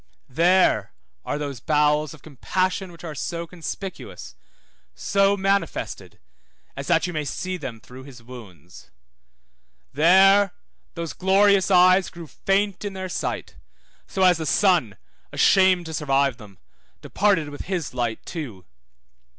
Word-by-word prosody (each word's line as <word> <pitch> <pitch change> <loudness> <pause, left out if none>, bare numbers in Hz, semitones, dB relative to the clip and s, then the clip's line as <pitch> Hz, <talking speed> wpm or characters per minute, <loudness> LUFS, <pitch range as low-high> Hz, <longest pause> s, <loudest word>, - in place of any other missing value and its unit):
There 175 +7 +2 0.3
are - - -3
those 140 -4 -5
bowels 150 +2 +1
of 150 - -21
compassion 185 +6 -2
which 170 0 -15
are 160 -3 -6
so 170 +3 -4
conspicuous, 180 +3 -8 0.6
so 200 0 +2
manifested, 195 +1 -2 0.6
as - - -7
that - - +2
you 175 - -4
may 155 -2 -2
see 185 +5 -4
them 130 -9 -7
through 125 +4 -13
his 125 -4 -13
wounds. 95 - -13 1.0
There 190 +5 +5 0.4
those 170 -2 -5
glorious 195 +1 +3
eyes 185 0 +5
grew 170 -1 -10
faint 195 +5 -1
in 205 -1 -4
their 190 -1 -5
sight, - - -4 0.5
so 190 - -1
as 180 -2 +5
the 160 - -3
sun, 175 - +2 0.3
ashamed 185 -2 +4
to 160 - -7
survive 140 -4 +1
them, 105 -5 -14 0.5
departed 190 -7 +1
with 145 - -8
his 180 -9 -3
light 120 -3 -3
too. 120 - -7
170 Hz, 135 wpm, -23 LUFS, 140-190 Hz, 1.0 s, There